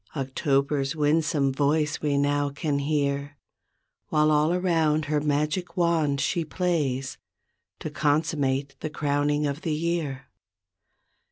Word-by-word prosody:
October's 135 +1 0
winsome 150 -2 +1
voice 150 +2 +1
we 145 -2 +1
now 145 0 +1
can 145 0 -2
hear, 140 0 -1 0.7
While 155 0 +3
all 150 +2 +3
around, 165 -4 +1
her 150 0 0
magic 150 +6 -1
wand 160 -5 +2
she 170 +4 0
plays, 150 -6 -1 0.6
To 155 - -4
consummate 145 -2 0
the 155 - -4
crowning 145 0 0
of 145 +2 -3
the 155 -2 -1
year. 155 -5 -2
150 Hz, 115 wpm, -26 LUFS, 140-155 Hz, 0.7 s, While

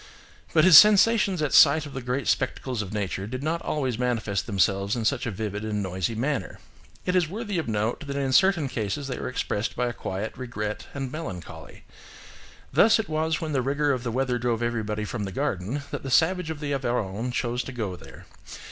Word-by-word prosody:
"But 155 - +4
his 180 -4 +11
sensations 210 -4 +4
at 145 - -1
sight 155 +1 +6
of 145 - -9
the 135 - -5
great 125 +2 -2
spectacles 125 -4 -1
of 100 -2 -6
nature 100 -2 -3
did 130 +4 -5
not 165 +2 -1
always 130 -6 -2
manifest 115 -5 -1
themselves 100 0 +1
in 115 -2 -3
such - - 0
a - - 0
vivid 105 0 -4
and 105 -2 -2
noisy 95 +3 -2
manner. 135 +4 -2 0.5
It 180 - 0
is 175 -4 +2
worthy 205 -1 -3
of 160 - -4
note 110 +6 -2
that 140 - -4
in 135 -2 -1
certain 175 0 +4
cases 115 +3 -3
they 130 - -4
were - - -3
expressed 115 -3 -2
by 125 - 0
a 120 - -2
quiet 105 0 -5
regret 105 -4 -5
and 135 -2 -4
melancholy. 90 - -8 0.9
Thus, 225 +2 +6
it 220 -5 -3
was 160 +1 0
when 160 -1 -3
the 135 -3 +1
rigour 145 +3 +1
of 130 -3 -1
the 120 - -3
weather 125 +1 0
drove 120 -1 -1
everybody 110 -2 -2
from 105 -1 -4
the 95 - -5
garden 100 +10 -2
that - - -4
the 135 - -6
savage 170 +4 +2
of 160 -2 -5
the 145 -1 -2
Aveyron 120 -3 -2
chose 120 0 -1
to - - -6
go 110 -7 -4
there. - - -13
125 Hz, 210 wpm, -26 LUFS, 105-150 Hz, 0.9 s, his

